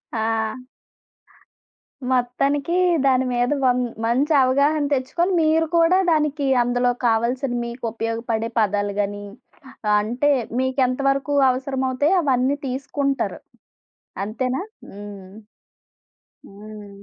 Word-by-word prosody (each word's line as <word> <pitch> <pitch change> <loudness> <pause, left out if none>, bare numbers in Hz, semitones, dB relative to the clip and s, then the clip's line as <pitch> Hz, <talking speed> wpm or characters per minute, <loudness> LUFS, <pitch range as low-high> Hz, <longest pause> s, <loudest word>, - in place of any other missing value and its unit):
ఆ! 220 - -1 1.9
మొత్తానికి 275 +5 0 0.3
దాని 260 -1 +3
మీద 245 +2 +1
వన్ 250 -1 +3 0.3
మంచి 270 +7 +1
అవగాహన 280 +4 +2
తెచ్చుకొని 335 +8 0
మీరు 320 +1 +2
కూడా 335 +2 +4
దానికి 300 -2 0 0.2
అందులో 245 0 +1
కావాల్సిన 240 +3 +1
మీకు 235 +1 -8
ఉపయోగపడే 230 0 -3
పదాలు 205 -1 0
గాని, 205 0 -2 0.8
అంటే 245 +7 0 0.3
మీకెంత 260 0 0
వరకు 275 +1 -1
అవసరమవుతాయో 265 +5 0
అవన్నీ 270 0 +1
తీసుకుంటారు. 275 +1 -2 0.9
అంతేనా? 255 - -2 0.3
హ్మ్. 200 -2 -10 1.2
హ్మ్. 210 0 -11
255 Hz, 90 wpm, -22 LUFS, 230-280 Hz, 1.9 s, కూడా